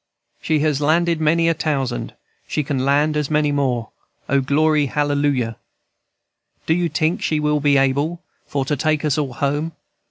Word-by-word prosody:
"She 155 -2 +1
has 150 -2 +1
landed 165 +2 +2
many 165 +2 +3
a 165 - +3
tousand, 135 -6 -2 0.3
She 150 - -1
can 135 -3 -2
land 145 +3 +2
as 150 -2 -1
many 150 -1 +2
more. 125 -6 -1 0.4
O, 140 0 +2
glory, 150 +2 +2
hallelujah! 145 -5 0
&c. - - -52
"Do 160 - +2
you 175 0 0
tink 160 +2 0
she 155 - 0
will 150 0 +1
be 145 -1 +3
able 140 +5 +1 0.3
For 140 -2 -2
to 150 - 0
take 155 +1 0
us 150 0 +1
all 140 -4 -2
home? 145 +5 -1
150 Hz, 170 wpm, -20 LUFS, 140-155 Hz, 0.4 s, many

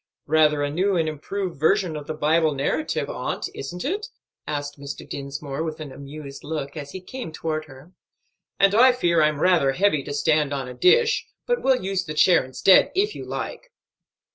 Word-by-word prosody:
"Rather 150 -1 +3
a 145 - -1
new 190 +5 +1
and 165 -1 +1
improved 170 +3 -4
version 180 +1 +2
of 145 -1 -7
the 155 - -4
Bible 155 0 +2
narrative, 145 - -1
aunt, - - -3
isn't 180 +5 -6
it?" 405 - -2 0.4
asked 145 -1 -4
Mr. 140 0 -7
Dinsmore, 140 +1 -5
with 160 -1 -4
an 150 -3 -7
amused 140 0 -9
look, 145 -2 -4
as 145 -2 -6
he 190 - -7
came 210 +1 -7
toward 155 -1 -3
her. 140 +4 -15 0.7
"And 195 0 +5
I 250 +4 +6
fear 170 -9 +2
I'm 150 -1 +2
rather 165 -7 +3
heavy 185 -2 +2
to 145 - -6
stand 150 -1 +2
on 135 -2 -4
a 125 - -7
dish; 450 - +3 0.2
but 485 0 0
will 265 -1 +3
use 190 -1 -1
the 155 -2 -6
chair 180 0 +5
instead, 130 +9 +4
if 415 +3 +1
you - - -8
like." - - -6
155 Hz, 190 wpm, -24 LUFS, 145-195 Hz, 0.7 s, I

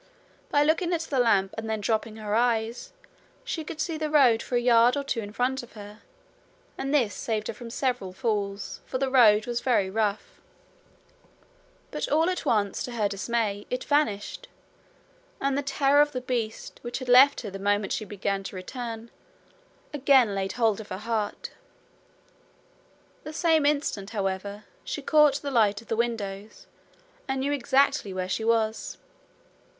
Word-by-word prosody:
By 290 - +3
looking 330 +3 +1
at 335 - 0
the 285 -5 -2
lamp 200 -5 +3
and 220 0 -6
then 220 -1 -1
dropping 220 +1 -1
her 215 -1 -4
eyes, 230 0 0 0.5
she 320 - -4
could 310 0 -8
see 315 0 -2
the 310 -1 -2
road 260 -7 +5
for 250 - -4
a - - +4
yard 240 +1 +4
or 285 - -1
two 275 -4 -2
in 205 -2 -6
front 255 +4 -1
of 240 - -14
her, 210 0 -11 0.8
and 270 +1 -4
this 250 -8 +2
saved 215 -2 -3
her - - -3
from 235 +2 -10
several 245 -6 -2
falls, 200 -1 -3
for 255 - -4
the 265 0 -1
road 215 -5 +6
was 240 -1 -2
very 205 -7 +1
rough. 210 -1 -2 1.5
But - - -3
all 320 +4 +3
at 365 - -4
once, 205 -3 +1
to 245 - -4
her 215 -3 +1
dismay, 205 0 -2
it 250 0 -3
vanished, 285 -9 -1 0.9
and 275 0 0
the 285 - 0
terror 275 +1 +3
of 295 0 +1
the 255 - -3
beast, 235 -3 -4
which 240 0 -4
had 255 - -7
left 260 +3 +6
her 210 -5 -6
the 195 - -7
moment 205 0 0
she - - -2
began 200 -1 -3
to 195 - -7
return, 230 +4 -6 0.8
again 265 -6 +4
laid 195 -1 -2
hold 225 -3 +1
of 215 - -13
her 185 - -4
heart. 215 0 -3 1.7
The 305 - -7
same 320 -2 +3
instant, 280 -9 -1
however, 200 0 -3 0.2
she 290 - -5
caught 295 -1 +4
the 280 - -3
light 210 -5 +3
of 225 - -17
the 225 - 0
windows, 215 -3 -3 0.6
and 265 -1 -1
knew 280 +2 0
exactly 275 -4 +2
where 185 -1 -2
she 205 +4 -2
was. 225 -1 0
230 Hz, 170 wpm, -26 LUFS, 210-275 Hz, 1.7 s, road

